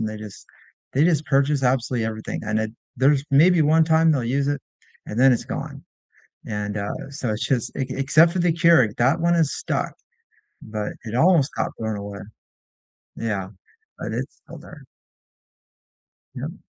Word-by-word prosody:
and 110 Hz, -, -1 dB
they 110 Hz, -, -6 dB
just 105 Hz, -2 st, -10 dB, 0.5 s
they 140 Hz, +4 st, +3 dB
just 155 Hz, -4 st, +2 dB
purchase 140 Hz, 0 st, +2 dB
absolutely 125 Hz, -2 st, +1 dB
everything, 110 Hz, 0 st, -5 dB
and 110 Hz, 0 st, -1 dB
it 110 Hz, 0 st, -2 dB, 0.3 s
there's 135 Hz, +2 st, +3 dB
maybe 165 Hz, +5 st, +5 dB
1 160 Hz, +2 st, +4 dB
time 160 Hz, 0 st, +4 dB
they'll 130 Hz, -5 st, 0 dB
use 140 Hz, +4 st, 0 dB
it 145 Hz, -1 st, -1 dB, 0.5 s
and 110 Hz, -, -5 dB
then 135 Hz, -, +7 dB
it's 120 Hz, -, -1 dB
gone, -, -, -6 dB, 0.6 s
and, 105 Hz, -1 st, -3 dB
uh, 100 Hz, 0 st, -3 dB, 0.2 s
so 135 Hz, -4 st, -3 dB
it's 105 Hz, 0 st, -2 dB
just 125 Hz, -4 st, 0 dB
ec 135 Hz, -1 st, -3 dB
except 155 Hz, +6 st, +4 dB
for 185 Hz, -, -2 dB
the 170 Hz, -1 st, +3 dB
Keurig, 165 Hz, -10 st, +4 dB
that 135 Hz, +7 st, +2 dB
one 170 Hz, 0 st, +3 dB
is 160 Hz, -4 st, +1 dB
stuck, -, -, -3 dB, 0.7 s
but 105 Hz, -1 st, -5 dB
it 110 Hz, +1 st, -5 dB
almost 160 Hz, -1 st, +3 dB
got -, -, -1 dB
blown 110 Hz, -1 st, -2 dB
away. 100 Hz, 0 st, -7 dB, 1.0 s
Yeah, -, -, -3 dB, 0.5 s
but -, -, -5 dB
it's -, -, -5 dB
still -, -, -11 dB
there. -, -, -13 dB, 1.5 s
Yep. -, -, -7 dB
135 Hz, 170 wpm, -23 LUFS, 110-155 Hz, 1.5 s, then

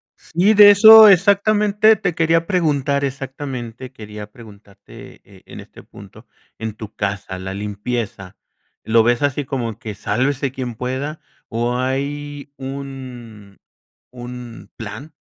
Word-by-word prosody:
Sí, 185 Hz, +6 st, +1 dB
de 205 Hz, 0 st, +9 dB
eso 220 Hz, +1 st, +9 dB
exactamente, 205 Hz, +2 st, +3 dB
te 180 Hz, -5 st, -3 dB
quería 165 Hz, 0 st, +1 dB
preguntar 145 Hz, -6 st, 0 dB
exactamente 130 Hz, -2 st, -7 dB
quería 105 Hz, -3 st, -10 dB
preguntarte, 100 Hz, -3 st, -15 dB
eh, -, -, -19 dB
en -, -, -11 dB
este -, -, -14 dB
punto, -, -, -15 dB, 0.3 s
en 110 Hz, -1 st, -5 dB
tu 110 Hz, -1 st, -11 dB
casa, 100 Hz, -2 st, -4 dB
la 95 Hz, +1 st, -6 dB
limpieza. 105 Hz, -1 st, -5 dB, 0.5 s
¿Lo 110 Hz, 0 st, +3 dB
ves 120 Hz, +1 st, +1 dB
así 145 Hz, 0 st, -1 dB
como 120 Hz, -5 st, -4 dB
que 110 Hz, -, -7 dB
sálvese 130 Hz, +6 st, -1 dB
quien 125 Hz, -3 st, -6 dB
pueda? 130 Hz, +6 st, -4 dB, 0.3 s
o 120 Hz, +1 st, -2 dB
¿hay 140 Hz, +2 st, -4 dB
un 130 Hz, -7 st, -9 dB, 0.5 s
un 125 Hz, -1 st, -10 dB
plan 130 Hz, +7 st, -9 dB
130 Hz, 125 wpm, -19 LUFS, 110-145 Hz, 0.5 s, de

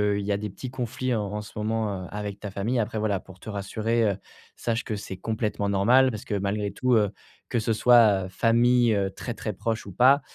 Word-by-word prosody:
qu'il 100 Hz, -, -2 dB
y 105 Hz, -, -1 dB
a 100 Hz, -, +2 dB
des 105 Hz, 0 st, -4 dB
petits 125 Hz, +6 st, -8 dB
conflits 130 Hz, 0 st, -2 dB
en 105 Hz, -2 st, 0 dB
en 105 Hz, 0 st, -3 dB
ce 105 Hz, -, -11 dB
moment, 105 Hz, -3 st, -1 dB
heu, -, -, -8 dB
avec 105 Hz, -1 st, -5 dB
ta 100 Hz, -, -6 dB
famille. 110 Hz, +6 st, -1 dB
Après 110 Hz, 0 st, -2 dB
voilà, 105 Hz, -3 st, 0 dB
pour 95 Hz, 0 st, -15 dB
te 110 Hz, -, -9 dB
rassurer, 110 Hz, +3 st, -1 dB
heu, 100 Hz, -3 st, +1 dB, 0.4 s
sache 115 Hz, 0 st, -2 dB
que 110 Hz, -, -3 dB
c'est 95 Hz, -2 st, -7 dB
complètement 105 Hz, -1 st, -2 dB
normal. 120 Hz, +7 st, +5 dB
Parce 110 Hz, -3 st, -6 dB
que -, -, -4 dB
malgré 100 Hz, +1 st, -1 dB
tout, 125 Hz, +4 st, 0 dB
heu, 105 Hz, -3 st, +3 dB, 0.4 s
que 120 Hz, -, +1 dB
ce 110 Hz, +1 st, -1 dB
soit, 110 Hz, -5 st, +5 dB
heu, -, -, -6 dB
famille, 120 Hz, +3 st, +3 dB
heu, 95 Hz, -1 st, 0 dB
très, 120 Hz, +4 st, -5 dB
très 110 Hz, -, -4 dB
proche 110 Hz, +3 st, -3 dB
ou 100 Hz, -, -8 dB
pas, 130 Hz, +8 st, +5 dB
105 Hz, 240 wpm, -26 LUFS, 100-115 Hz, 0.4 s, normal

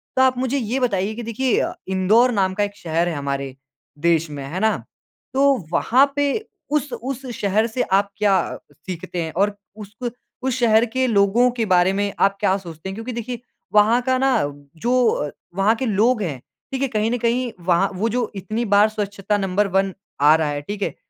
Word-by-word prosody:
तो 260 Hz, -, +3 dB
आप 260 Hz, -1 st, +4 dB
मुझे 260 Hz, +2 st, 0 dB
ये 245 Hz, +1 st, -1 dB
बताइए 210 Hz, -5 st, 0 dB
कि 240 Hz, -, -6 dB
देखिए 230 Hz, +3 st, 0 dB
अ, -, -, -1 dB
इंदौर 200 Hz, +7 st, +3 dB
नाम 190 Hz, -4 st, +1 dB
का 205 Hz, -, 0 dB
एक 205 Hz, 0 st, -3 dB
शहर 165 Hz, -1 st, -1 dB
है 165 Hz, -, -3 dB
हमारे 140 Hz, -2 st, -3 dB, 0.5 s
देश 165 Hz, -1 st, +2 dB
में 145 Hz, -2 st, -6 dB
है 170 Hz, +6 st, -4 dB
ना, 220 Hz, +2 st, +2 dB, 0.6 s
तो 275 Hz, +1 st, +4 dB, 0.2 s
वहाँ 255 Hz, +9 st, +4 dB
पे 285 Hz, -1 st, +1 dB, 0.4 s
उस 295 Hz, -2 st, 0 dB
उस 260 Hz, +3 st, -5 dB
शहर 205 Hz, +3 st, +1 dB
से 235 Hz, +2 st, -2 dB
आप 200 Hz, +1 st, +2 dB
क्या 210 Hz, -2 st, +3 dB, 0.5 s
सीखते 180 Hz, -1 st, -4 dB
हैं? 160 Hz, -, -5 dB
और 200 Hz, +3 st, +1 dB, 0.2 s
उसक 220 Hz, +3 st, -6 dB, 0.3 s
उस 260 Hz, -1 st, 0 dB
शहर 225 Hz, -1 st, +4 dB
के 260 Hz, +3 st, -1 dB
लोगों 215 Hz, +3 st, +4 dB
के 235 Hz, -2 st, -1 dB
बारे 185 Hz, -2 st, +4 dB
में 200 Hz, 0 st, -1 dB
आप 200 Hz, 0 st, +3 dB
क्या 190 Hz, 0 st, +2 dB
सोचते 170 Hz, -2 st, -8 dB
हैं? -, -, -5 dB
क्योंकि 225 Hz, +4 st, -5 dB
देखिए 235 Hz, +1 st, -5 dB, 0.3 s
वहाँ 215 Hz, +4 st, +5 dB
का 260 Hz, +1 st, +1 dB
ना 265 Hz, 0 st, +2 dB, 0.5 s
जो 250 Hz, +1 st, +3 dB
अ, 145 Hz, -, -1 dB, 0.3 s
वहाँ 200 Hz, +4 st, +3 dB
के 260 Hz, -, -3 dB
लोग 220 Hz, +2 st, +2 dB
है, 160 Hz, -7 st, -2 dB, 0.4 s
देखिए 270 Hz, +1 st, 0 dB
कहीं 220 Hz, -2 st, 0 dB
न 245 Hz, -, +1 dB
कहीं 240 Hz, +1 st, 0 dB
वहाँ 180 Hz, +2 st, +3 dB
वो 215 Hz, +5 st, 0 dB
जो 240 Hz, 0 st, -1 dB
इतनी 215 Hz, +5 st, -3 dB
बार 210 Hz, +2 st, +6 dB
स्वच्छता 205 Hz, -1 st, -2 dB
नंबर 195 Hz, +1 st, +1 dB
1 195 Hz, 0 st, +1 dB, 0.3 s
आ 150 Hz, +2 st, +7 dB
रहा 160 Hz, -2 st, 0 dB
है, 145 Hz, 0 st, -3 dB
ठीक 205 Hz, +7 st, -6 dB
है। -, -, -2 dB
210 Hz, 200 wpm, -21 LUFS, 190-245 Hz, 0.6 s, आ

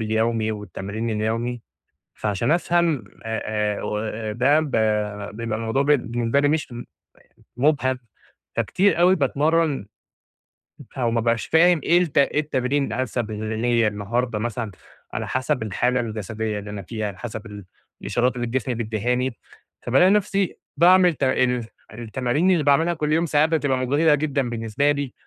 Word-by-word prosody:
اليومي 110 Hz, 0 st, 0 dB
والتمرين 105 Hz, +2 st, -5 dB
اليومي، 115 Hz, +3 st, -2 dB, 0.5 s
فعشان 105 Hz, +6 st, -1 dB
افهم 170 Hz, -, +2 dB, 0.2 s
آآ 110 Hz, 0 st, -3 dB, 0.4 s
آآ، -, -, -7 dB
و 105 Hz, 0 st, -2 dB, 0.3 s
ده 135 Hz, +6 st, +3 dB
ب 155 Hz, -4 st, -3 dB, 0.6 s
بيبقى 115 Hz, -1 st, -3 dB
الموضوع 115 Hz, +4 st, 0 dB
بالنسبة 120 Hz, -3 st, +1 dB
لي 145 Hz, -, +3 dB
مش 150 Hz, -4 st, -1 dB, 0.8 s
مُبهَم، 130 Hz, -1 st, +2 dB, 0.6 s
فكتير 195 Hz, -2 st, +2 dB
أوي 180 Hz, +2 st, +6 dB
باتمرّن 150 Hz, 0 st, +1 dB, 1.0 s
ب -, -, -12 dB
أو 120 Hz, -2 st, +1 dB
ما 115 Hz, 0 st, +1 dB
بقاش 115 Hz, 0 st, 0 dB
فاهم 175 Hz, +1 st, +4 dB
إيه 175 Hz, -, +4 dB
الت 160 Hz, -5 st, -1 dB
أيه 140 Hz, +1 st, +3 dB
التمرين 140 Hz, -1 st, 0 dB
الأنسب 120 Hz, -3 st, -2 dB
ل 110 Hz, +1 st, -4 dB
ليّا 120 Hz, -2 st, +2 dB
النهاردة 105 Hz, +3 st, -2 dB
مثلًا، 115 Hz, -1 st, -3 dB, 0.4 s
على -, -, -4 dB
حسب 130 Hz, -2 st, -1 dB
الحالة 125 Hz, +4 st, 0 dB
الجسدية 110 Hz, -1 st, -3 dB
اللي 105 Hz, 0 st, -8 dB
أنا 105 Hz, -1 st, -6 dB
فيها، 110 Hz, +3 st, -4 dB
على 95 Hz, -2 st, -9 dB
حسب 105 Hz, -1 st, -7 dB, 0.4 s
الإشارات 125 Hz, +1 st, 0 dB
اللي 120 Hz, -, -2 dB
الجسم 125 Hz, +1 st, -2 dB
بيدّيهاني، 120 Hz, +3 st, -1 dB, 0.4 s
فبالاقي 135 Hz, +10 st, +4 dB
نفسي 200 Hz, -2 st, +1 dB, 0.2 s
باعمل 180 Hz, 0 st, +6 dB
ت -, -, -11 dB
ال 125 Hz, -3 st, +1 dB, 0.3 s
التمارين 125 Hz, -, 0 dB
اللي 160 Hz, -4 st, +2 dB
باعملها 160 Hz, +5 st, +3 dB
كل 150 Hz, -2 st, -1 dB
يوم، 165 Hz, +2 st, +2 dB
ساعات 150 Hz, 0 st, +3 dB
بتبقى 145 Hz, -5 st, +1 dB
مُجهِدة 145 Hz, +5 st, +3 dB
جدًا 140 Hz, -4 st, -1 dB
بالنسبة 115 Hz, +5 st, 0 dB
لي، 140 Hz, -3 st, -4 dB
125 Hz, 145 wpm, -23 LUFS, 110-150 Hz, 1.0 s, أوي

